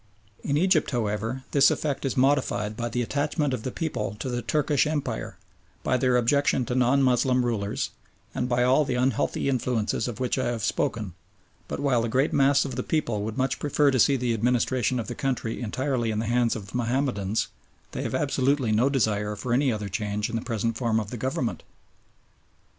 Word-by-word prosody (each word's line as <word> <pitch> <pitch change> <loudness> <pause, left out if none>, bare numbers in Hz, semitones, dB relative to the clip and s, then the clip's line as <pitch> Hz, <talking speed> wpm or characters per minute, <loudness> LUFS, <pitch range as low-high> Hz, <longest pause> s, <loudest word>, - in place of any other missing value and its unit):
In 140 - 0
Egypt, 175 -1 +3
however, 115 +1 -2
this 140 -1 +6
effect 145 -2 -2
is 135 - -2
modified 130 -6 +1
by 120 +1 -3
the 120 +1 -1
attachment 145 +2 -1
of 125 - -2
the 130 - -3
people 115 - -3
to 130 - -3
the 120 -1 -2
Turkish 150 +4 +1
Empire, 145 - -3 0.5
by - - +1
their 125 -1 +3
objection 130 +1 +2
to 125 - -3
non 130 +2 +3
Moslem 125 0 +3
rulers, 105 -4 -2 0.4
and 125 - -2
by 125 0 +2
all 130 +4 +4
the 130 - -2
unhealthy 125 +1 0
influences 125 -4 0
of 120 -1 -5
which 130 +1 0
I 130 - 0
have 120 -3 -2
spoken; 115 - -1 0.5
but - - -4
while 135 -4 +2
the 115 - -1
great 130 +6 +1
mass 140 0 +4
of 135 -2 -5
the - - 0
people 120 -9 -1
would 110 +3 -4
much 130 0 0
prefer 145 0 +2
to 130 - +1
see 140 +4 +5
the 125 -2 0
administration 125 +2 +1
of 115 - -3
the 120 - -5
country 125 -3 -2
entirely 125 +1 -1
in 110 - -1
the 110 - -1
hands 120 +1 +2
of 105 -3 -8
Mahomedans, 120 -3 0 0.4
they - - -4
have - - -2
absolutely 135 -3 +1
no 115 +6 +3
desire 105 -6 0
for 120 +4 -3
any 135 +1 +3
other 105 -2 -3
change 105 +3 -2
in - - -3
the 115 - -1
present 115 -1 -2
form 115 -3 +1
of 105 -2 -5
the - - -4
Government. 130 0 -2
125 Hz, 200 wpm, -26 LUFS, 115-135 Hz, 0.5 s, this